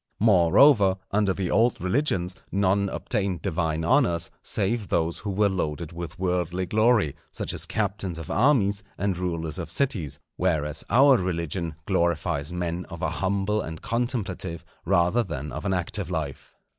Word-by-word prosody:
Moreover, 100 Hz, -, +5 dB
under 105 Hz, -1 st, +2 dB
the 95 Hz, -1 st, -2 dB
old 120 Hz, +1 st, +3 dB
religions 95 Hz, -, 0 dB, 0.2 s
none 100 Hz, 0 st, +2 dB
obtained 100 Hz, -6 st, -2 dB
divine 80 Hz, -3 st, -1 dB
honours 120 Hz, -, +2 dB
save 105 Hz, +1 st, -1 dB
those 85 Hz, 0 st, 0 dB
who 105 Hz, -, -5 dB
were 100 Hz, +1 st, +2 dB
loaded 85 Hz, -4 st, -3 dB
with 85 Hz, +2 st, -7 dB
worldly 90 Hz, 0 st, -1 dB
glory, 110 Hz, -, +2 dB, 0.2 s
such -, -, -4 dB
as -, -, -1 dB
captains 100 Hz, -4 st, -2 dB
of 80 Hz, -2 st, -6 dB
armies 105 Hz, -5 st, +3 dB, 0.2 s
and 100 Hz, -2 st, 0 dB
rulers 85 Hz, -2 st, -3 dB
of 85 Hz, -2 st, -5 dB
cities; 100 Hz, -, -1 dB, 0.2 s
whereas 80 Hz, -4 st, 0 dB
our 135 Hz, +1 st, +6 dB
religion 85 Hz, -3 st, -2 dB
glorifies 85 Hz, -4 st, 0 dB
men 90 Hz, 0 st, -3 dB
of 85 Hz, -, -7 dB
a -, -, 0 dB
humble 100 Hz, +2 st, 0 dB
and 80 Hz, 0 st, -7 dB
contemplative, 100 Hz, -8 st, -2 dB, 0.2 s
rather 90 Hz, +5 st, +3 dB
than 75 Hz, -, -5 dB
of -, -, -6 dB
an 95 Hz, -, +1 dB
active 90 Hz, +1 st, -2 dB
life. 80 Hz, -6 st, -5 dB
95 Hz, 150 wpm, -25 LUFS, 85-105 Hz, 0.2 s, our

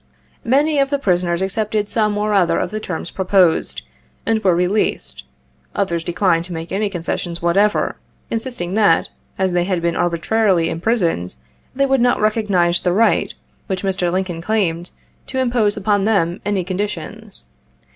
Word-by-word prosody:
Many 285 Hz, +4 st, +2 dB
of 275 Hz, 0 st, +2 dB
the 285 Hz, -, +1 dB
prisoners 180 Hz, -6 st, 0 dB
accepted 210 Hz, +1 st, -1 dB
some 210 Hz, -1 st, 0 dB
or 210 Hz, 0 st, 0 dB
other 185 Hz, -4 st, +3 dB
of -, -, -2 dB
the 215 Hz, -, -3 dB
terms 180 Hz, -5 st, -5 dB
proposed, 185 Hz, -3 st, +2 dB, 0.4 s
and 225 Hz, -1 st, 0 dB
were 185 Hz, -3 st, +4 dB
released; 180 Hz, -, -1 dB, 0.5 s
others 170 Hz, -4 st, -1 dB
declined 170 Hz, -1 st, +1 dB
to 180 Hz, -, -5 dB
make 165 Hz, 0 st, -6 dB
any 205 Hz, +2 st, 0 dB
concessions 175 Hz, -1 st, -3 dB
what 170 Hz, +1 st, 0 dB
ever 210 Hz, +1 st, +2 dB, 0.2 s
— -, -, -39 dB
insisting 225 Hz, -6 st, -3 dB
that, 210 Hz, 0 st, +3 dB, 0.3 s
as 190 Hz, -2 st, 0 dB
they 175 Hz, 0 st, +1 dB
had 185 Hz, -2 st, 0 dB
been 170 Hz, 0 st, -1 dB
arbitrarily 175 Hz, +1 st, +1 dB
imprison 170 Hz, -, 0 dB
ed, 90 Hz, -, -8 dB, 0.4 s
they 275 Hz, +1 st, +2 dB
would 270 Hz, -2 st, +2 dB
not 245 Hz, 0 st, +3 dB
recognize 200 Hz, -5 st, +2 dB
the 180 Hz, -, +1 dB
right, 225 Hz, +4 st, +2 dB, 0.3 s
which 190 Hz, -1 st, -3 dB
Mr. 185 Hz, -2 st, 0 dB
Lincoln 180 Hz, -2 st, -2 dB
claimed, 175 Hz, -4 st, -1 dB, 0.4 s
to 260 Hz, -, -5 dB
impose 240 Hz, -5 st, +1 dB
upon 205 Hz, 0 st, +1 dB
them 185 Hz, -5 st, +1 dB
any 205 Hz, -3 st, 0 dB
conditions. 205 Hz, -, -5 dB
195 Hz, 165 wpm, -19 LUFS, 175-215 Hz, 0.5 s, were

